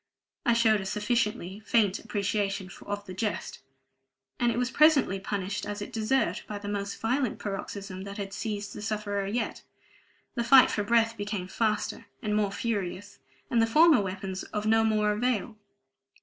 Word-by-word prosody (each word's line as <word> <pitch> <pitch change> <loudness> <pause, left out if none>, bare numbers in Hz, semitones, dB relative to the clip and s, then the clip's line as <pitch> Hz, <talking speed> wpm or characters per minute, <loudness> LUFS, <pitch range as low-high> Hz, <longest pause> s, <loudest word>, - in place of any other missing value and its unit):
I 235 - +6
showed 220 -3 +4
a - - -6
sufficiently 210 -3 -1
faint 215 -2 +2
appreciation 200 -2 -2 0.2
of 205 0 -4
the 185 - -8
jest. 210 +3 -3 0.8
And 240 0 +3
it - - -3
was 250 +1 0
presently 285 -10 +4
punished 200 +1 -3
as 205 0 -4
it 205 - -7
deserved, 225 +5 0
by 210 - -4
the 205 0 -7
most 200 -1 -3
violent 250 +2 0
paroxysm 195 -1 -5
that 200 +1 -7
had 195 -1 -5
seized 210 -1 -4
the - - -7
sufferer 205 -2 -2
yet: 225 +3 -2 0.7
the 235 - -1
fight 260 +2 +7
for 210 - 0
breath 230 +1 +3
became 205 -3 -3
faster 215 +1 -1 0.2
and 210 -1 0
more 210 -2 +1
furious, 205 -2 -3 0.3
and 235 - +4
the 225 - +3
former 310 +1 +6
weapons 190 -1 -4
of 210 0 -4
no 225 +1 +4
more 215 -1 +2
avail. 230 0 -1
210 Hz, 165 wpm, -28 LUFS, 200-230 Hz, 0.8 s, fight